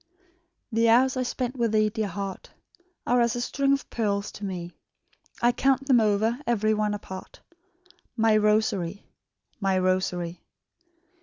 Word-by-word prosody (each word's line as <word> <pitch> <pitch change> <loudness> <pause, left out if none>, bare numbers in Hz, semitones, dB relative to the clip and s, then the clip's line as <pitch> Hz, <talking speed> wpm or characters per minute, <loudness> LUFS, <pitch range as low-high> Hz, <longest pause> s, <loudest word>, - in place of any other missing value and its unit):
"The 230 +1 +3
hours 255 +4 +4
I 255 - -1
spent 250 0 -3
with 230 -2 0
thee, 215 0 +3
dear 215 0 -2
heart, 195 +1 -6 0.6
Are 245 0 +3
as 235 0 +1
a - - -2
string 275 +3 0
of 275 -1 0
pearls 205 -3 -1
to 210 - -11
me; 180 -3 -5 0.7
I 240 - +5
count 270 +2 +1
them 260 -3 +5
over, 220 +3 +1
ev'ry 215 -2 +2
one 210 -1 0
apart, 190 -2 -9 0.8
My 225 -1 +4
rosary, 210 -3 +1 0.5
my 195 -2 +1
rosary. 185 -2 -1
215 Hz, 145 wpm, -26 LUFS, 200-240 Hz, 0.8 s, I